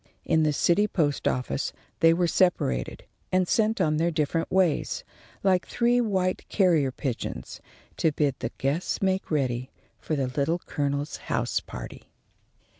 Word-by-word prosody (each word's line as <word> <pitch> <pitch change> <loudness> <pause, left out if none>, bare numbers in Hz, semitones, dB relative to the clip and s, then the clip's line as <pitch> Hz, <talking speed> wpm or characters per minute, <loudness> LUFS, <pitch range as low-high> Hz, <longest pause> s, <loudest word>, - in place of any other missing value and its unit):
In 160 - +3
the 155 -1 +3
city 175 +7 +3
post 150 -8 0
office 125 +2 -1 0.3
they 165 - +6
were 175 +1 +2
separated, 165 - +1 0.3
and 185 -1 +2
sent 220 +2 +2
on 155 -1 +2
their 165 +2 +2
different 160 0 -1
ways, 185 -5 +1 0.4
like 185 -2 +2
three 245 0 +2
white 190 -5 -1
carrier 165 -9 +3
pigeons, 130 -2 -5 0.4
to 160 - +2
bid 145 -2 +1
the 115 - -2
guests 140 +6 -1
make 190 0 0
ready 130 -4 -1 0.3
for 155 - -2
the 135 -2 0
Little 140 +6 0
Colonel's 145 -3 -2
house - - -1
party. - - -9
160 Hz, 145 wpm, -26 LUFS, 140-185 Hz, 0.4 s, they